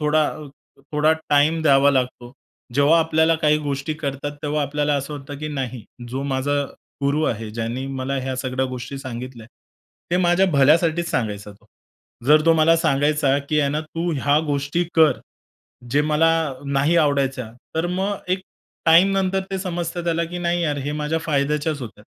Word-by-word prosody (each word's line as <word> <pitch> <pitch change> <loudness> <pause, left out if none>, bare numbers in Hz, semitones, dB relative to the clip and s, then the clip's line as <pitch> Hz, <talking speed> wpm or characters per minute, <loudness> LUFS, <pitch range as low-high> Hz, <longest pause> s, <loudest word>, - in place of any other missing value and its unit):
थोडा 150 0 +2 0.7
थोडा 155 +1 +3 0.2
टाइम 150 +3 +3
द्यावा 140 -1 +5
लागतो. 125 -2 -2 0.4
जेव्हा 145 +4 +5
आपल्याला 160 0 +3
काही 150 0 +4
गोष्टी 145 +1 -3
कळतात 145 -1 -4
तेव्हा 150 0 -1
आपल्याला 145 +1 0
असं 140 +2 -3
वाटतं 145 0 -8
की 155 +1 -4
नाही 130 -6 -4 0.2
जो 135 +3 -4
माझा 140 +1 0 0.4
गुरु 145 +3 +1
आहे, 110 -1 -2
ज्याने 115 +4 -4
मला 135 0 -3
ह्या 130 -1 -3
सगळ्या 130 0 -2
गोष्टी 130 +1 -6
सांगितल्या 125 -3 -7 0.6
ते 175 - +2
माझ्या 180 +1 +3
भल्यासाठीच 165 +4 +3
सांगायचा 105 -6 -3
तो. 105 +2 -24 0.6
जर 150 +2 +6
तो 165 - +7
मला 160 +1 +4
सांगायचा 145 -3 +2
की 150 -1 +3
आहे 140 - +1
ना, 150 +1 -1
तू 165 +2 -4
ह्या 145 +1 +3
गोष्टी 145 +4 -1
कर 155 -5 +5 0.8
जे 145 +2 +3
मला 155 +2 +3 0.4
नाही 140 +4 +1
आवडायच्या 135 -6 +1 0.2
तर 165 +2 0
मग 195 +3 -1
एक 185 +1 +1 0.5
टाइम 170 +4 +6
नंतर 190 0 +1
ते 195 - -1
समजतं 175 -2 -3
त्याला 170 0 0
की 175 +2 -6
नाही 175 0 0
यार 150 -3 -1
हे 145 - -2
माझ्या 150 +2 -1
फायद्याच्याच 150 0 -1
होत्या. 105 -3 -9
145 Hz, 165 wpm, -22 LUFS, 135-160 Hz, 0.8 s, तो